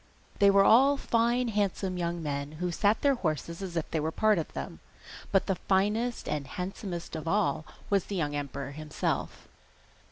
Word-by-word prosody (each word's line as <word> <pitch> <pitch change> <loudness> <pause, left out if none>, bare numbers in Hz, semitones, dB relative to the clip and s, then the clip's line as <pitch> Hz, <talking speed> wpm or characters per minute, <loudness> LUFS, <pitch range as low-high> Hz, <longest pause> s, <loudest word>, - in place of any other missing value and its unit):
They 200 -1 +7
were 195 0 +6
all 270 +7 +6
fine 235 0 +1
handsome 200 -3 -1
young 170 -1 -2
men, 140 0 -3
who 175 +3 -2
sat 205 +5 +2
their 280 -1 +5
horses 170 - -3
as 180 -3 -4
if 160 - -3
they 160 - 0
were 155 +1 -1
part 215 +1 +3
of 160 - -4
them, - - -6 0.5
but 195 - +3
the 195 - +1 0.2
finest 210 +5 +1
and 150 -2 -2
handsomest 180 0 -5
of 160 +1 -5
all 165 -5 +1 0.2
was 200 -2 +3
the 200 - -5
young 150 -5 -1
emperor 140 -1 -4
himself. 150 +1 -3
180 Hz, 180 wpm, -29 LUFS, 155-210 Hz, 0.5 s, They